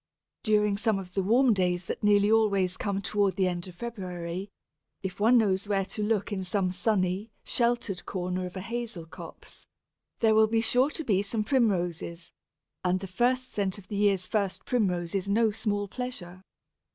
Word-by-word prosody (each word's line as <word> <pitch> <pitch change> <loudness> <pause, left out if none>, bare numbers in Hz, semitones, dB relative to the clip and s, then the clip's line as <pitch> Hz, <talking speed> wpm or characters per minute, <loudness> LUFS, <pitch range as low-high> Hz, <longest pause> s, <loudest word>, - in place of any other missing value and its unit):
During 210 -2 +2
some 220 -1 +1
of 185 -2 -8
the 195 - +1
warm 235 +5 +4
days 180 -2 0
that - - -5
nearly 205 0 +4
always 200 -5 +3
come 200 0 -2
towards 200 -2 +1
the 190 -1 +3
end 175 0 -3
of 180 - -11
February, 185 -4 -5 0.5
if 190 0 -5
one 230 +4 +5
knows 200 -3 +2
where 195 -2 +1
to 210 - -5
look 210 -1 0
in 190 -2 -2
some 185 0 0
sunny, 190 +1 0
sheltered 235 -5 0
corner 180 0 -2
of 180 - -11
a 190 - -4
hazel 230 -5 -5
copse, 160 - -12 0.5
there 220 -1 +4
will 220 0 +5
be 225 +1 +1
sure 250 +4 +3
to 320 - -4
be 200 -8 +2
some 215 +2 -1
Primroses, 180 - 0 0.5
and 185 0 +1
the 195 - -6
first 250 +7 0
scent 195 -2 -1
of 185 -2 -14
the 205 - -4
year's 200 -2 +2
first 200 0 -2
Primrose 180 -8 0
is 195 0 -1
no 220 +2 +3
small 205 -1 -2
pleasure. 190 -7 -6
200 Hz, 180 wpm, -28 LUFS, 185-220 Hz, 0.5 s, one